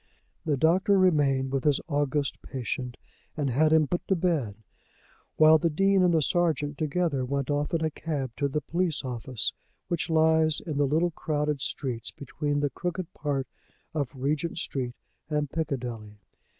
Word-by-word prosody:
The 150 -3 +1
doctor 185 +7 +4
remained 140 -8 +3
with 135 -1 -1
his 145 -2 +3
august 145 -2 -1
patient 125 0 -4 0.4
and 140 -3 0
had 155 +5 +3
him 160 -1 +5
put 175 - -3
to 190 - +3
bed, 160 - 0 0.8
while 155 0 +7
the 170 - +2
Dean 195 +4 +3
and 180 -1 +4
the 160 -2 +3
sergeant 155 -3 +1
together 155 -2 0
went 140 +1 -1
off 145 0 0
in 160 -1 0
a 155 - -1
cab 145 -5 -3
to 140 - +1
the 150 +2 -2
police 170 -1 -1
office 120 -4 -3 0.4
which 170 -1 -1
lies 160 -1 +3
in 155 -4 -5
the 145 - +3
little 165 +5 +2
crowded 150 -2 -1
streets 125 -5 -3
between 145 +1 -3
the 145 -1 0
crooked 175 0 -4
part 140 -3 -2 0.5
of 145 -5 -1
Regent 145 +6 -1
Street 125 -6 -3 0.3
and 150 -2 -1
Piccadilly. 120 -9 -4
150 Hz, 165 wpm, -27 LUFS, 135-160 Hz, 0.8 s, while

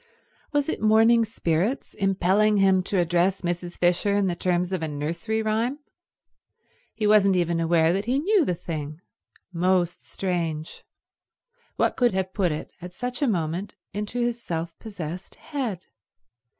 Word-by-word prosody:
Was 290 -2 +1
it - - -3
morning 225 +2 +5
spirits 205 - -1
impelling 195 +2 +2
him 190 -1 +4
to 195 - -1
address 175 +2 +2
Mrs. 175 0 -3
Fisher 180 +3 +2
in 205 -1 +2
the 180 -2 0
terms 180 +1 0
of 185 - -1
a 160 - -1
nursery 165 +10 -2
rhyme? 225 +5 0 1.2
He 215 - -2
wasn't 205 -2 +5
even 170 -1 +1
aware 165 0 +3
that 195 +2 -1
he 250 +3 +1
knew 380 +5 +3
the 180 - 0
thing. 155 -2 -6 0.5
Most 175 0 +1
strange. 165 -4 -3 0.9
What - - +1
could 245 -6 +3
have 190 0 -2
put 185 -5 +1
it, 150 - -5
at 180 +1 -8
such 250 +1 -4
a 285 - +3
moment, 175 -1 -2 0.2
into 210 +4 -3
his 240 0 -1
self 165 -2 -4
possessed 180 -4 -7
head? 245 - -4
190 Hz, 150 wpm, -25 LUFS, 170-220 Hz, 1.2 s, morning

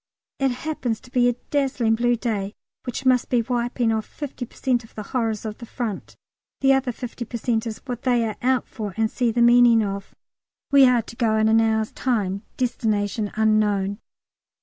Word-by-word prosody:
It 270 -1 +2
happens 245 -4 -3
to 250 - -17
be 245 -1 +3
a - - +1 0.2
dazzling 260 -6 +1
blue 240 +2 +2
day, 215 -4 -3 0.3
which 250 +2 -4
must 255 -1 +3
be 240 -2 +2
wiping 240 -1 0
off 220 -1 -2
50 270 -4 -6
per - - -22
cent 250 -2 0
of 225 - -18
the 215 - -5
horrors 225 -2 -2
of 215 -1 -5
the 235 - -8
Front. 225 -6 -5 0.5
The 270 0 +5
other 265 -2 +1
50 240 0 -6
per 235 +1 -6
cent 230 -1 -1
is 220 -1 -4
what 245 -3 -5
they 245 -3 +2
are 215 - -3
out 255 0 +1
for, 205 -4 -6
and 220 -1 +1
see 245 -2 +1
the 235 +1 +2
meaning 240 -1 +6
of. 200 -1 -5 0.6
We 275 -2 +7
are 245 -2 +3
to 230 - -11
go 230 -3 +1
on 220 - +2
in 220 - +3
an 225 0 +5
hour's 220 -1 +1
time, 200 -6 -1 0.2
"destination 215 -4 -1
unknown." 210 -2 +2
235 Hz, 200 wpm, -23 LUFS, 220-250 Hz, 0.6 s, We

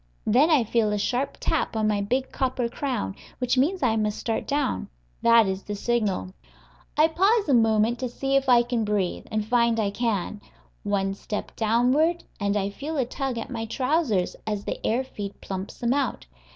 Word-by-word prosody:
Then 265 +9 +4
I 300 -7 +5
feel 225 -1 +1
a 210 - 0
sharp 250 +6 -1
tap - - -1
on 215 -1 +1
my 210 -1 +1
big 255 +6 -1
copper 255 -2 -1
crown, 235 - -3 0.2
which 250 -1 0
means 310 +6 +1
I 225 -3 +3
must 210 -1 0
start 225 -1 -2
down. 285 - -1 0.3
That 230 -1 +6
is 190 0 -2
the 205 - -5
signal. 200 - -1 0.6
I 310 +1 +6
pause 395 +7 +2
a 280 - +3
moment 225 0 +3
to 255 - -2
see 270 +3 -1
if 270 -1 +2
I 240 -1 +6
can 240 -2 -1
breathe, 205 -4 -1
and 215 -1 -1
find 235 0 +2
I 205 -2 +1
can. 210 -2 -2 0.4
One 195 -1 0
step 210 +1 -6
downward, 255 +10 +2 0.2
and 200 0 0
I 200 0 -1
feel 295 +9 -5
a 260 - +2
tug 260 0 -3
at 230 - -5
my 225 -2 -3
trousers 255 - 0
as 210 -2 -2
the - - -4
air 240 +4 +1
feed 205 -6 -7
plumps 190 0 -6
them 240 +1 +1
out. 275 - -1
235 Hz, 190 wpm, -25 LUFS, 210-265 Hz, 0.6 s, That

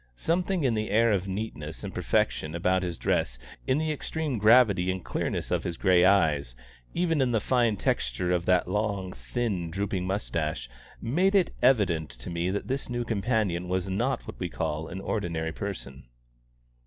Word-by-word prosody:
Something 175 - 0
in 130 -4 +2
the 110 0 -1
air 115 +2 +4
of 95 -2 0
neatness 95 -6 -5
and - - -5
perfection 80 +1 0
about 90 +2 +2
his 90 -2 -3
dress, - - 0 0.3
in 130 - +3
the 155 0 0
extreme 150 -3 -3
gravity 105 -4 +5
and 95 0 -3
clearness - - -2
of - - +1
his 85 - -4
grey 90 -2 +4
eyes, 75 -10 +3 0.4
even 165 -4 +2
in 125 -2 +2
the 110 - +3
fine 120 -2 +2
texture 60 +7 0
of 90 -1 0
that 90 -1 +3
long, 100 -1 -1
thin, 90 - -2
drooping 95 +1 -2
moustache, 80 - -2 0.4
made 180 - +2
it 190 -3 +3
evident 95 - +3
to - - -9
me 85 +1 -1
that 100 +2 -2
this 135 +1 -2
new 120 0 -1
companion 105 -5 0
was 95 +1 -1
not 95 - -1
what - - -9
we - - -2
call 75 +1 -3
an 95 +2 -6
ordinary 85 -6 -2
person. 80 -9 -6
95 Hz, 175 wpm, -28 LUFS, 85-115 Hz, 0.4 s, gravity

